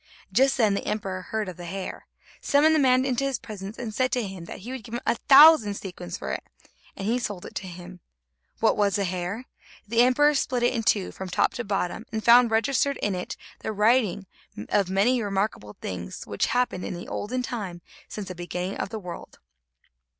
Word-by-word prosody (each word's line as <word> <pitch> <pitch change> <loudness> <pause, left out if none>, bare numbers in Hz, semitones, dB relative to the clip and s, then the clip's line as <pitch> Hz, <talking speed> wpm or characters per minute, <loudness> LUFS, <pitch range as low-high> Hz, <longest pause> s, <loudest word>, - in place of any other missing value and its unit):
Just 265 +6 +4
then 220 -5 +3
the 200 - -3
emperor 190 -3 -2
heard 215 +2 -3
of 185 - -7
the 175 - -8
hair, 190 +2 -6 0.3
summoned 300 +3 +4
the 315 - +4
man 255 -1 +4
into 260 0 0
his 275 -2 0
presence, 210 -4 -8
and 230 -3 -5
said 255 +3 +1
to 245 -3 0
him 190 -3 -8
that - - -9
he 235 +6 -7
would 260 -3 -6
give 230 +3 -7
him 240 - -3
a - - +3 0.2
thousand 275 -7 +8
sequins 180 -2 -7
for - - -5
it, - - -3 0.5
and 195 - -5
he 235 +4 +1
sold 205 -6 -5
it - - -9
to 190 - -5
him. 180 +1 -10 0.6
What 225 - +3
was 200 -2 +2
the 200 - +1
hair? 185 +6 -3 0.4
The 230 +2 +3
emperor 290 +4 +5
split 255 -3 0
it 245 - +3
in 230 - -1
two 205 -3 +1
from 190 -1 -7
top - - +1
to 245 - -4
bottom, 200 +2 -2
and 220 -1 -3
found 240 0 +7
registered 275 +5 +1
in 205 - -1
it 180 0 -5 0.3
in - - -2
writing 210 -2 +2 0.6
many 210 +7 +2
remarkable 195 - -2
things, 90 -1 -6
which 100 - -1
happened 245 -6 0
in - - -4
the 175 - -8
olden 250 +4 -3
time 190 -9 -5 0.2
since 210 -3 -6
the 185 - -5
beginning 180 +2 -4
of - - -2
the 225 - -5
world. 180 -4 -9
210 Hz, 210 wpm, -26 LUFS, 185-245 Hz, 0.6 s, thousand